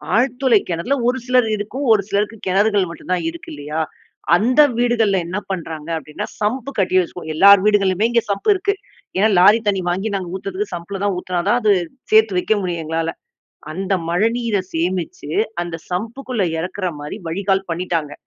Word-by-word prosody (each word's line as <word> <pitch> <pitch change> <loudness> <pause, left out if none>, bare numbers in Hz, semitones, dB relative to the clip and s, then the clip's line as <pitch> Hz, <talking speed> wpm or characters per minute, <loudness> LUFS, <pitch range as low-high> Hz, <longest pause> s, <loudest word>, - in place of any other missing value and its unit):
ஆழ்துளை 245 -2 +3
கிணறுல 170 +12 0
ஒரு 255 +1 +2
சிலரு 250 -3 +3
இருக்கும் 255 +7 -4
ஒரு 210 -2 +5
சிலருக்கு 210 +2 -1
கிணறுகள் 200 0 +2
மட்டும் 170 - -8
தான் 175 -2 -1
இருக்கு 170 0 -10
இல்லயா! 150 +2 -4 0.5
அந்த 250 +10 +4 0.2
வீடுகள்ல 225 -5 +2
என்ன 185 +4 -2
பண்ணுறாங்க 165 -3 -5
அப்பிடின்னா, 155 -1 -6
சம்பு 250 +6 -1
கட்டி 185 -1 +2
வச்சுக்கோம். 170 -2 -7
எல்லார் 200 +2 +7
வீடுகளிலுமே 205 0 +3
இங்கே 235 -1 +2
சம்பு 200 - +1
இருக்கு. 400 +2 0 0.4
ஏன்னா, 215 +3 +4
லாரி 210 +5 +6
தண்ணீ 195 -3 +1
வாங்கி 195 +4 -2
நாங்க 180 -2 -6
ஊற்றுறதுக்கு 195 0 -4
சம்புல 190 +3 -6
தான் 200 -2 +1
ஊத்துனா 180 -1 -2
தான் 240 - +3
அது 210 -1 +5 0.4
சேர்த்து 215 -4 +5
வைக்க 220 - +1
முடியும் 170 -3 -3
எங்களால. 165 +1 -1 0.6
அந்த 190 +3 -3 0.2
மழைநீரை 225 +2 +1
சேமிச்சு 170 -3 -2 0.3
அந்த 170 -1 -5
சம்புக்குள்ளே 230 +3 -2
இறக்கிறமாரி 175 -3 -4
வழிகால் 195 +2 0
பண்ணிட்டாங்க. 165 -4 -2
195 Hz, 160 wpm, -20 LUFS, 175-220 Hz, 0.6 s, எல்லார்